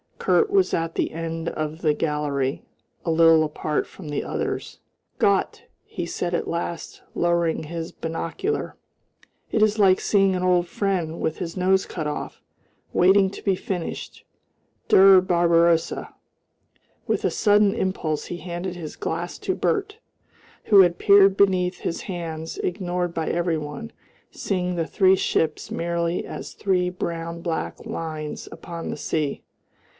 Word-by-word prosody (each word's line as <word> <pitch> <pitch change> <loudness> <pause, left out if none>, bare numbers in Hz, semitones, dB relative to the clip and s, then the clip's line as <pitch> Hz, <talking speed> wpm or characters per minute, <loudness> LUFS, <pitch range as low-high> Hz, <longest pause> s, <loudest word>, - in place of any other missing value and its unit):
Kurt 435 - +2
was 390 -2 +3
at 165 0 -1
the - - 0
end 165 0 -4
of 155 +2 -4
the 155 -3 +3
gallery, 150 -3 -1 0.4
a 165 - +1
little 165 -1 +6
apart 150 0 -2
from 165 -6 -10
the 145 - -2
others. - - -4 0.4
"Gott!" - - +1 0.2
he - - -5
said 175 0 -3
at - - -2
last, 170 0 -4
lowering 170 -2 +1
his 165 +1 -5
binocular, 165 - -3 0.8
"it 220 - +1
is 215 0 +2
like 190 -3 +5
seeing 195 -2 +3
an 180 - -2
old 180 -1 +3
friend 175 -4 -2
with 160 - -1
his 170 0 -5
nose 190 +1 +2
cut 155 -4 -4
off 150 - -5 0.5
waiting 190 +2 +5
to - - -10
be 195 -2 +2
finished. 180 -2 -5 0.7
Der 190 -1 +8
Barbarossa!" 170 -2 +2 0.9
With - - 0
a - - +2
sudden 205 -1 +4
impulse 160 -5 -2
he 175 - -5
handed 175 +1 -5
his 160 -4 -7
glass 170 +2 -4
to 375 - -2
Bert, 415 0 -1 0.7
who 200 -2 +7
had 175 -2 +3
peered 200 -1 +6
beneath 185 -2 +2
his 165 - -3
hands, 165 -4 -5
ignored 180 -1 -2
by 160 -1 -2
every 170 -1 0
one, 150 - -6 0.4
seeing 180 -2 -2
the 165 -2 -1
three 190 -2 +4
ships 160 -4 -1
merely 170 0 -1
as - - -7
three 180 -2 +1
brown 170 -1 -4
black 170 -2 -4
lines 155 -2 -5
upon 170 -1 -7
the - - -4
sea. 150 -3 -2
170 Hz, 145 wpm, -24 LUFS, 165-190 Hz, 0.9 s, Der